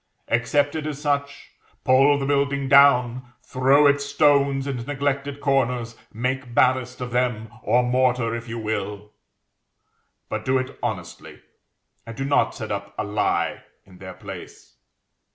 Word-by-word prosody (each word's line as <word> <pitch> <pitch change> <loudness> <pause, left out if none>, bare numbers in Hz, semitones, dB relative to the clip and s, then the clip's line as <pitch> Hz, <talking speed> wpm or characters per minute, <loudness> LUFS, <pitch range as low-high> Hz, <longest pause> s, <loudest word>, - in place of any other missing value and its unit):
Accept 145 +5 +1
it 155 -1 -4
as 145 -2 -5
such, 140 -1 -2 0.3
pull 135 +3 +4
the 140 - -3
building 140 -1 0
down, 130 -3 +4
throw 135 +3 +3
its 140 0 +3
stones 140 -1 +2
into 130 -4 -4
neglected 140 +1 -2
corners, 125 -5 0 0.2
make 125 +2 -3
ballast 125 0 +2
of 125 -1 -5
them, 120 -2 -1
or 125 +2 +2
mortar, 125 -2 +1
if 115 0 -5
you 115 - -5
will; 105 -2 -4 1.2
but - - -4
do 130 0 +1
it 130 0 -5
honestly, - - -6 0.6
and 115 -1 -10
do 135 - -3
not 140 - +1
set 110 -4 -6
up 100 0 -5
a - - -1
Lie 105 +1 -1 0.2
in 95 -2 -18
their 95 -1 -9
place. - - -11
130 Hz, 145 wpm, -23 LUFS, 115-140 Hz, 1.2 s, pull